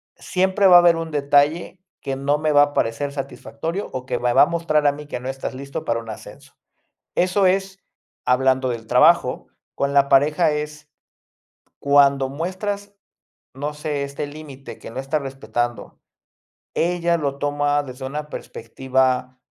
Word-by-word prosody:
siempre 190 +2 +1
va 180 - +8
a - - +9
haber 175 -1 +5
un 165 0 -4
detalle 145 +5 +1 0.2
que 135 - -3
no 140 +2 0
me 155 0 0
va 145 -1 +6
a 145 0 -2
parecer 115 +5 -1
satisfactorio, 160 +6 -5
o 130 -1 -5
que - - -2
va 125 - 0
me - - +1
va 135 - +7
a - - +6
mostrar 165 -3 0
a - - +5
mí 145 +1 -10
que 145 - -5
no 125 - -7
estás 135 0 -5
listo 140 +1 -6
para 115 0 0
un 115 - -11
ascenso. 110 - -11 0.6
Eso 185 +2 +2
es 195 +1 0 0.5
hablando 130 0 +2
del 115 -2 -5
trabajo. - - +3 0.3
Con 140 0 -1
la 140 -1 +4
pareja 150 +4 +4
es, 150 0 -5 0.9
cuando 140 -1 +4
muestras, 200 +7 -4 0.6
no 145 +3 -4
sé, 150 -1 -3
este 140 +1 -5
límite 145 -2 -10
que - - -9
no 130 - -6
está 135 +3 -1
respetando. 120 -3 -4 0.8
Ella 170 0 +1
lo 140 -3 -3
toma 145 0 0
desde 130 -1 -8
una 150 +2 -5
perspectiva, 130 +1 -2
145 Hz, 165 wpm, -22 LUFS, 135-160 Hz, 0.9 s, a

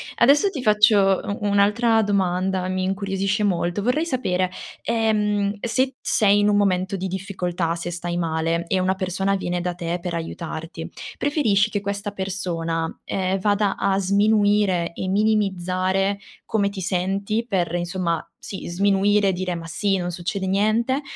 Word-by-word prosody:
Adesso, 285 +10 +5
ti 300 -9 -5
faccio 210 -3 +4
u 205 - -3
un'altra 210 +3 +3
domanda, 190 -2 0
mi 185 0 -1
incuriosisce 195 +2 -1
molto. 180 0 0
Vorrei 250 +9 +1
sapere, 185 - 0 0.3
ehm, 210 -3 0
se 240 +4 +1
t 265 - -26
sei 205 -1 +3
in 205 - +3
un 210 - +3
momento 190 -1 +1
di 190 0 -3
difficoltà, 180 -3 -2
se 170 +1 -5
stai 175 0 -4
male 165 0 0
e 190 - +1
una 185 +1 +1
persona 190 +1 -1
viene 180 -2 -2
da 180 0 -2
te 175 0 -3
per 180 -1 -4
aiutarti, 165 0 -5 0.3
preferisci 230 -8 +2
che 205 -2 -2
questa 200 +1 -3
persona, 175 -4 -2
ehm, 190 0 -1
vada 205 0 +1
a 195 0 +1
sminuire 205 -3 +2
e 185 - -4
minimizzare 195 -1 +1 0.3
come 200 -2 +1
ti 195 -2 -6
senti 195 +4 -1
per, 175 -5 0
insomma 175 -1 -1
sì, 195 - -7
sminuire 200 +2 +3
e - - +1
dire: 180 0 -2
"Ma 165 -1 -7
sì, 195 +4 0
non 175 -1 -3
succede 190 +3 -3
niente", 215 +7 +1
195 Hz, 155 wpm, -23 LUFS, 180-205 Hz, 0.3 s, Adesso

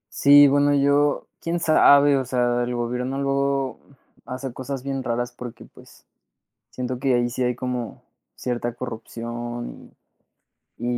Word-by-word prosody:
Sí, 145 0 +7
bueno, 145 +1 +3
yo, 140 +1 +2 0.2
¿quién 170 +1 -2
sabe? 145 -3 +5
O 130 - -2
sea, 120 -1 +1
el 125 0 -3
gobierno 125 +2 -2
luego, 140 -1 0
mm, - - -21 0.3
hace 130 0 -5
cosas 130 +1 -6
bien 135 0 -3
raras 120 0 -2
porque, 120 -1 -9
pues, - - -18 0.7
siento 125 0 -4
que 135 -1 +1
ahí 120 0 +1
sí 130 +2 -5
hay 125 -1 +1
como 125 -1 -5 0.3
cierta 120 -1 -3
corrupción, 120 0 -7 0.9
y 120 - -8
125 Hz, 140 wpm, -23 LUFS, 120-140 Hz, 0.9 s, Sí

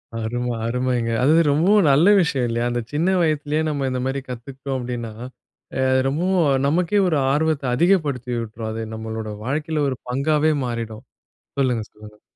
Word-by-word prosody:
அரும, 120 +2 -2 0.2
அருமைங்க. 125 0 0
அதுவும் 160 +4 +4
ரொம்ப 160 +6 +2 0.2
நல்ல 150 +7 +5
விஷயம் 140 -8 +1
இல்லையா? 120 +1 -1
அந்த 120 - -1
சின்ன 170 +6 +2
வயதிலேயே 155 -1 0
நம்ம 140 -3 -1
இந்த 130 - -2
மாரி 135 +1 -1
கத்துக்ட்டோம் 130 +2 -6
அப்டின்னா, 120 -2 -5 0.7
அது 130 0 +3
ரொம்ப 145 +6 -1 0.4
நமக்கே 175 +6 +2
ஒரு 160 -4 +1
ஆர்வத்த 155 0 +1
அதிகப்படுத்தியூட்ரும். 125 - 0
அது 110 0 -4
நம்மளுடைய 110 -1 -5
வாழ்க்கைல 150 +3 -1
ஒரு 130 - -4
பங்காவே 150 +4 +2
மாறிடும். 115 -2 -5 0.6
சொல்லுங்க 125 -5 +1
சொல்லுங்க. 105 0 -15
130 Hz, 140 wpm, -22 LUFS, 120-150 Hz, 0.7 s, நல்ல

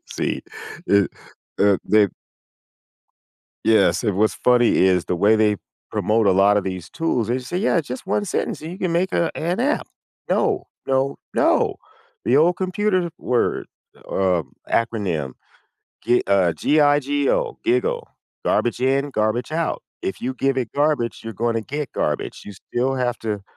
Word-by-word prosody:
See, - - -2 0.5
it 100 -1 +3 0.5
uh 100 -1 +4
they 105 -1 +4 1.6
Yes, 110 +2 +4
and 100 -4 0
what's 110 +1 +3
funny 125 -1 +3
is 90 -2 +3
the 90 - -1
way 105 +5 +4
they 105 -1 +3 0.3
promote 110 0 +1
a 95 - +6
lot 100 +2 +5
of 100 - 0
these 95 -3 -5
tools, 125 -9 -1
they 125 +2 0
say, 130 +8 -4
"Yeah, 195 -1 +2
it's 160 - -1
just 125 +7 -6
one 205 +2 0
sentence 180 - -2
and 160 - -6
you 180 - -7
can 185 -4 -1
make 180 +3 0
a 170 - +1
an 175 +6 -1
app." 290 +3 0 0.4
No, - - +1 0.2
no, 135 +1 +1 0.2
no. - - +2 0.5
The 125 - +3
old 170 +3 +4
computer 185 -1 0
word 125 -1 0 0.4
or, 95 -2 +1
um, 80 - -9 0.2
acronym, 95 - -1 0.7
g 120 +1 +3
uh, 95 -4 +3
G-I-G-O, 145 - +2
GIGO. 465 +7 +1 0.4
Garbage 120 +1 +1
in, 135 +2 +1
garbage 110 +4 -1
out. 165 0 -1 0.2
If - - -3
you 125 +2 -2
give 135 0 0
it 120 -4 -2
garbage, 145 -5 +1
you're 115 - -5
gonna 115 +2 -1
get 145 +4 -4
garbage. - - -2
You 105 - -8
still 125 +7 -2
have 125 -2 -1
to 105 -3 -3
125 Hz, 160 wpm, -22 LUFS, 105-155 Hz, 1.6 s, a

